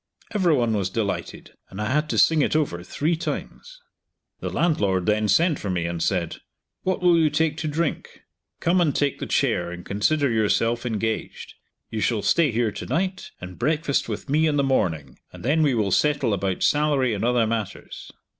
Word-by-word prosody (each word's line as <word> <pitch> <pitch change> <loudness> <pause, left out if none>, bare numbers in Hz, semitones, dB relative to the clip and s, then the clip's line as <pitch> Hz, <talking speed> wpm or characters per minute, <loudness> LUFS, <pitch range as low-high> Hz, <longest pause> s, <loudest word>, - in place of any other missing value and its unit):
Every 180 -7 +3
one 120 -4 +1
was 100 -3 0
delighted, 100 0 -4 0.2
and 95 - -9
I 105 +3 -1
had 150 +2 +1
to - - -1
sing 160 -2 +4
it 145 - +1
over 140 - 0
three 155 - -1
times. - - -6 0.6
The - - -4
landlord 100 - +1
then 105 +1 +1
sent 155 - +3
for 100 - -4
me 90 -2 -1
and 85 -1 -3
said. 85 -2 -1 0.4
"What 185 -1 -2
will 175 -2 +5
you 155 -1 +4
take 160 0 +1
to 165 - -3
drink? 155 +1 -3 0.4
Come 180 +2 +2
and 150 -5 +1
take 145 -2 0
the - - -4
chair, 85 0 +1
and 90 0 -8
consider 140 +8 +1
yourself 115 +2 +1
engaged. 110 -1 -3 0.4
You 110 - -3
shall 105 +1 0
stay 165 -5 +3
here 115 -1 0
to - - -7
night, 185 +2 -2
and 90 0 -9
breakfast 150 +2 0
with - - -5
me 155 +3 +2
in 150 -1 +1
the 140 - +2
morning, 85 - -1
and - - -11
then 155 +5 +2
we 145 -5 +3
will 105 -4 0
settle 145 -2 +2
about 95 -1 -1
salary 145 -5 +2
and 105 - -3
other 120 -1 +2
matters." 110 -2 -5
125 Hz, 190 wpm, -24 LUFS, 105-155 Hz, 0.6 s, will